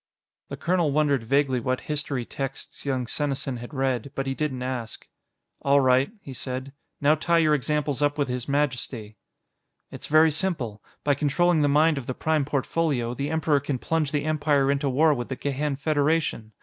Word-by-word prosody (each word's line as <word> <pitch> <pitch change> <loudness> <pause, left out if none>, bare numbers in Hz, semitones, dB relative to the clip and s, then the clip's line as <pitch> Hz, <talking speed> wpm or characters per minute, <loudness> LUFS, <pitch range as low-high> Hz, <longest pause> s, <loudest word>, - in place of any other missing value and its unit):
The - - -6
colonel 175 -3 +1
wondered 145 -3 +2
vaguely 135 +2 +1
what 130 +2 -1
history 145 -4 -2
texts 135 +2 -6
young 130 -2 0
Senesin 135 0 -2
had 120 +1 -9
read, 135 -2 -1
but 135 - -2
he 135 - -1
didn't 135 -3 -2
ask. 125 -3 -5 0.5
"All 140 0 +4
right," 130 +4 +3
he 140 - -9
said, 130 +2 -5 0.3
"now 145 +1 +4
tie 170 +2 +1
your 155 -2 +4
examples 150 -1 0
up 145 0 +1
with 145 -2 +1
His 125 +1 -4
Majesty." 125 -6 -2 0.7
"It's - - -7
very 155 +1 +5
simple. 145 - -2 0.2
By 145 - +3
controlling 155 +4 +2
the 145 - +3
mind 150 +1 +4
of 125 - -10
the 130 - -3
Prime 155 -3 +1
Portfolio, 140 -3 -1
the 140 +3 -3
Emperor 160 -2 +2
can 140 -1 -3
plunge 155 +2 -1
the 145 -1 -1
Empire 145 -3 +2
into 140 0 0
war 150 +4 +4
with 120 -3 -4
the 130 - -2
Gehan 145 +1 -2
Federation. 145 -6 0
140 Hz, 180 wpm, -25 LUFS, 130-150 Hz, 0.7 s, very